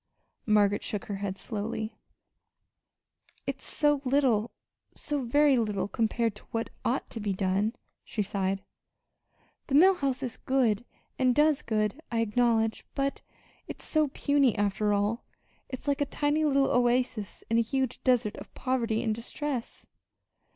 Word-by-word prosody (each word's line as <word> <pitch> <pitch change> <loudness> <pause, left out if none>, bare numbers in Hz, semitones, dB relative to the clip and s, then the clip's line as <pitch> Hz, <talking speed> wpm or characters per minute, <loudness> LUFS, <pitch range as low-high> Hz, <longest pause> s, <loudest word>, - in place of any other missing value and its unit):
Margaret 205 -1 +4
shook 210 - -4
her 200 - -4
head 195 -1 -3
slowly. 215 +1 -4 1.5
"It's - - -4
so 295 -2 +1
little 250 -5 +2 0.5
so 290 -2 -2
very 275 +2 +4
little 210 -3 -1
compared 225 +1 0
to - - -16
what 225 0 -3
ought 255 - 0
to 230 - -5
be 205 -2 -1
done," 195 +4 0 0.3
she 210 - -2
sighed. 195 0 -2 1.0
"The 275 - 0
Mill 370 +6 +8
House 275 -7 -2
is 245 - -4
good 245 -4 +1 0.3
and 255 -2 +3
does 300 -1 +4
good, 215 +4 -1
I 230 -1 +1
acknowledge; 225 0 +1
but 275 0 -1 0.5
it's - - -7
so 310 -1 +2
puny 275 -3 +2
after 205 +1 +1
all. 205 +4 0 0.5
It's 260 +2 -7
like 285 +1 +1
a - - +3
tiny 295 +2 0
little 275 -2 +3
oasis 245 -4 +1
in 230 +1 +2
a - - +5
huge 260 +2 -1
desert 245 -5 +2
of - - -10
poverty 235 -4 0
and 220 -2 +1
distress." 245 +3 -5
235 Hz, 145 wpm, -29 LUFS, 210-275 Hz, 1.5 s, Mill